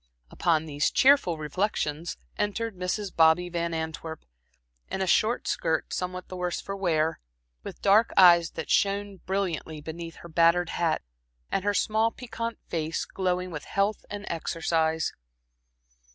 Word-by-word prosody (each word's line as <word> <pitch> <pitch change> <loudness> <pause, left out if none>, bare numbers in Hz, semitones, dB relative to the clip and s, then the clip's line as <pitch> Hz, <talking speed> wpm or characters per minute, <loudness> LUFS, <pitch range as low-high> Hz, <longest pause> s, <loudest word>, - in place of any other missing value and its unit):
Upon 160 -2 +1
these 145 -1 0
cheerful 265 - +4
reflections 155 0 -2 0.2
entered 210 +1 -2
Mrs. 180 +2 -3
Bobby 165 +2 +4
Van 170 -1 -2
Antwerp, 160 0 -5 0.6
in - - -3
a 190 - +1
short 220 +6 +2
skirt 160 -1 -1
somewhat 180 0 -4
the 185 - -8
worse 180 -2 -2
for 195 - -5
wear, 165 -5 0 0.4
with - - -9
dark 210 +3 +5
eyes 170 -2 +7
that 160 - -5
shone 200 0 +1
brilliantly 180 -5 -3
beneath 165 +2 -7
her - - -8
battered 170 +1 +3
hat, 170 -2 0 0.5
and 190 - 0
her 205 0 +1
small 220 +2 +2
piquante 230 -1 -5
face 160 -1 -2
glowing 180 -1 -2
with 150 -3 -6
health 200 +2 0
and 205 0 -6
exercise. 160 -1 0
175 Hz, 140 wpm, -27 LUFS, 160-200 Hz, 0.6 s, eyes